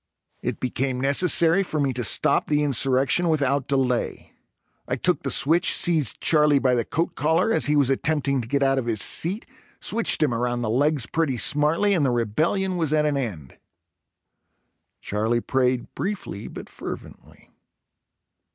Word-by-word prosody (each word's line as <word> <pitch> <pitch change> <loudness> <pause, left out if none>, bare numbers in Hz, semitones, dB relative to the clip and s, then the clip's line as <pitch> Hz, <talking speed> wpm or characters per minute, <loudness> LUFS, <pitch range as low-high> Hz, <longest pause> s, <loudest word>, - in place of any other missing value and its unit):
It - - -4
became 130 0 -2
necessary 165 +6 +3
for 160 -5 -3
me 140 -2 0
to 125 0 -3
stop 100 - +1
the 150 0 +1
insurrection 135 +5 +2
without 140 -3 0
delay. 130 -3 -2 0.5
I - - -1
took - - 0
the - - -3
switch, 165 +5 +2
seized 160 -7 +1
Charlie 150 -2 +3
by 130 -2 +1
the 120 -1 +1
coat 165 +8 -2
collar, 160 +9 +1
as - - +1
he 150 - +2
was 140 -2 +2
attempting 140 -1 0
to 115 - -8
get 140 +3 0
out 135 0 +2
of 120 - -5
his 110 -3 -1
seat, 185 - 0 0.3
switched 225 -8 0
him 140 -5 +1
around 120 +1 -2
the 110 - -1
legs 140 +1 +1
pretty 150 -1 -1
smartly 155 - +2
and 170 -6 +1
the 135 - +2
rebellion 155 - -1
was 160 -4 0
at 150 -1 +2
an 150 -1 0
end. 95 - -5 1.4
Charlie 110 +3 -1
prayed 125 0 -1
briefly, 195 - -5
but - - -9
fervently. - - -10
140 Hz, 160 wpm, -23 LUFS, 125-160 Hz, 1.4 s, necessary